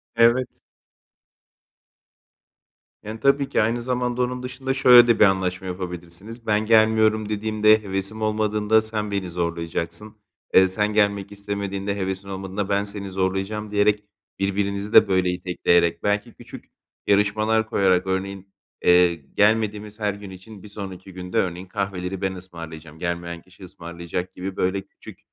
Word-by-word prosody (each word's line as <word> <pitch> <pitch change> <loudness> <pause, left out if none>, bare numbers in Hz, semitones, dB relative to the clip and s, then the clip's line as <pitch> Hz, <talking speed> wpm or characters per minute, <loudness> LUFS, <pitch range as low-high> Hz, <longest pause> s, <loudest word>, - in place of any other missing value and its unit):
Evet. 120 +2 +4 2.6
Yani, 110 +1 -7
tabii 140 +2 +2
ki - - +2
aynı 115 +2 0
zamanda 125 0 -1
onun 125 0 -2
dışında 130 +1 -3
şöyle 125 -3 +7
de 115 - +3
bir - - +7
anlaşma 95 -1 0
yapabilirsiniz. 90 +5 -7
Ben 105 0 +2
gelmiyorum 110 -1 +3
dediğimde, 110 0 +3
hevesim 100 +2 -4
olmadığında 110 0 +2
sen 110 -1 -3
beni 100 -2 -2
zorlayacaksın. 85 +4 -4 0.4
Eee, 95 0 +7
sen 105 +3 0
gelmek 100 -2 +1
istemediğinde, 100 -1 -4
hevesin 95 0 -4
olmadığında 95 +1 -4
ben 100 0 +1
seni 100 -1 -4
zorlayacağım 95 +3 -2
diyerek 105 0 +2 0.4
birbirinizi 100 +1 -1
de, - - +8
böyle, 95 -2 +2
itekleyerek, 90 -1 +1
belki 105 0 -1
küçük - - -12 0.4
yarışmalar 110 +2 +2
koyarak, 95 -4 +2
örneğin, 95 +1 -4 0.3
eee, 90 -1 +5
gelmediğimiz 105 +6 0
her 105 -2 0
gün 100 0 -10
için 95 +2 -12
bir - - -10
sonraki 95 -2 -9
gün 90 0 -8
de, - - +1
örneğin, 90 0 -1
kahveleri 95 -1 -4
ben 95 -1 -1
ısmarlayacağım, 80 -4 -10
gelmeyen 85 -1 -4
kişi 95 +2 -18
ısmarlayacak 85 +1 -6
gibi, 95 +1 -5
böyle, 95 +1 0
küçük - - -14
100 Hz, 140 wpm, -23 LUFS, 95-110 Hz, 2.6 s, de